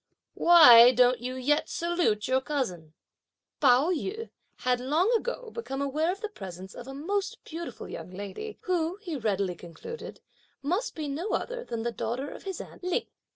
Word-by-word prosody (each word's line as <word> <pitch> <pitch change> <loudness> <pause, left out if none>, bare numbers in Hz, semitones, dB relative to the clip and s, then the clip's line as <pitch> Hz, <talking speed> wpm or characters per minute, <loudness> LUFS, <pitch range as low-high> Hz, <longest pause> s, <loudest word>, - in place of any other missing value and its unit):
Why 250 -8 +9
don't 250 0 +4
you 255 +1 -4
yet 290 +4 +1
salute 340 -12 0
your 260 +1 +2
cousin?" 185 - -3 0.7
Pao 270 +4 +5
yü 400 +7 -3 0.2
had 250 -1 0
long 315 - +2
ago 480 0 -3
become 275 - -5
aware 300 +5 0
of 395 +3 -7
the 430 - -3
presence 190 - -9
of 245 - -10
a 270 - -7
most 385 +8 -3
beautiful 335 +1 -7
young - - -7
lady, 200 - -7
who, 350 -2 0
he 340 -6 -4
readily 200 -7 0
concluded, 175 - -9 0.4
must 360 - -1
be 310 -2 -4
no 310 +9 -3
other 485 0 -2
than 230 - -4
the 235 - -1
daughter 245 +5 -3
of - - -11
his 385 -2 -4
aunt - - -10
Lin. 365 -1 0
285 Hz, 170 wpm, -28 LUFS, 240-360 Hz, 0.7 s, Why